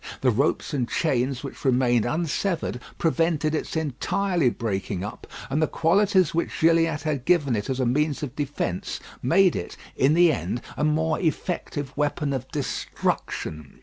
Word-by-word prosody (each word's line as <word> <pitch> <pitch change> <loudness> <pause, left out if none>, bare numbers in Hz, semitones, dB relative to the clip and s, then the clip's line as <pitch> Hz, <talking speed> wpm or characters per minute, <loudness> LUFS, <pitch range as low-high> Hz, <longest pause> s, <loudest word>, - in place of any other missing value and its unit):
The 130 - +4
ropes 140 +7 0
and 125 -4 -1
chains 130 -4 0
which 140 - -8
remained 125 -4 +3
unsevered 160 -1 -1 0.2
prevented 165 -2 +1
its 160 - -2
entirely 160 +2 +1
breaking 100 -5 -3
up, 105 - -7 0.2
and 140 +4 0
the 155 - +3
qualities 190 +1 +3
which 170 - -1
Gilliatt 165 -2 +3
had 150 -5 -1
given 145 -6 +3
it 105 +2 -3
as 130 0 -1
a 130 - +2
means 150 +4 +1
of 140 -2 -5
defence 140 -11 -3 0.2
made 185 +8 +4
it, 85 - -5 0.2
in 140 +4 +3
the 170 -2 +6
end, 120 -1 -3
a - - -2
more 155 +1 +1
effective 155 -4 -2
weapon 145 0 0
of 130 -1 -3
destruction. 75 - -3
145 Hz, 155 wpm, -25 LUFS, 125-165 Hz, 0.2 s, the